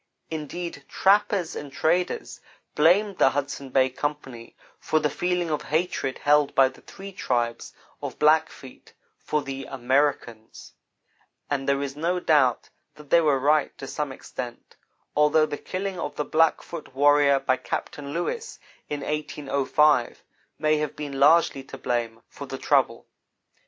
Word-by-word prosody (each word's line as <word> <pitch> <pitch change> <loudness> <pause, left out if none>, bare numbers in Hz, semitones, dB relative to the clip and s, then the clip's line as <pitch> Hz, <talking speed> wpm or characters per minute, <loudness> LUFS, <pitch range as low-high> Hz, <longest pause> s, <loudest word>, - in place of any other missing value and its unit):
Indeed, 160 0 -5
trappers 195 -3 +2
and 145 -1 -7
traders 160 - -1 0.3
blamed 190 +6 +3
the - - +6
Hudson 140 -1 -4
Bay 130 0 +2
Company 135 -4 -5 0.2
for 155 - +1
the 150 -1 0
feeling 180 0 -1
of 150 - -1
hatred 155 -4 -1
held 145 -1 +2
by 135 -1 +5
the 130 - -18
three 195 +1 -10
tribes 120 -9 -2 0.3
of - - -6
Black 155 +1 +4
feet 130 - -14 0.3
for 150 -1 -2
the 135 0 -6
"Americans"; 130 -3 -2 0.8
and 140 -1 -1
there 140 0 +1
is 135 -1 -5
no 170 +4 -1
doubt 145 -8 +2 0.3
that 150 -2 -15
they 170 - +6
were 150 -4 +3
right 145 +3 +1
to - - -7
some 150 +1 -4
extent, 125 -2 -8 0.4
although 150 +1 +4
the 150 - -4
killing 185 +4 -5
of 145 - -4
the 150 - -2
Blackfoot 160 -2 0
warrior 145 0 +4
by 130 -1 +1
Captain 140 +2 -5
Lewis 175 - -3 0.3
in 145 -1 -3
1805 150 -2 +1 0.3
may 155 0 +2
have 150 -1 -3
been 145 -2 -5
largely 150 -1 +4
to - - -9
blame 115 -2 -3
for - - -10
the - - -5
trouble. - - +1
145 Hz, 145 wpm, -25 LUFS, 135-160 Hz, 0.8 s, the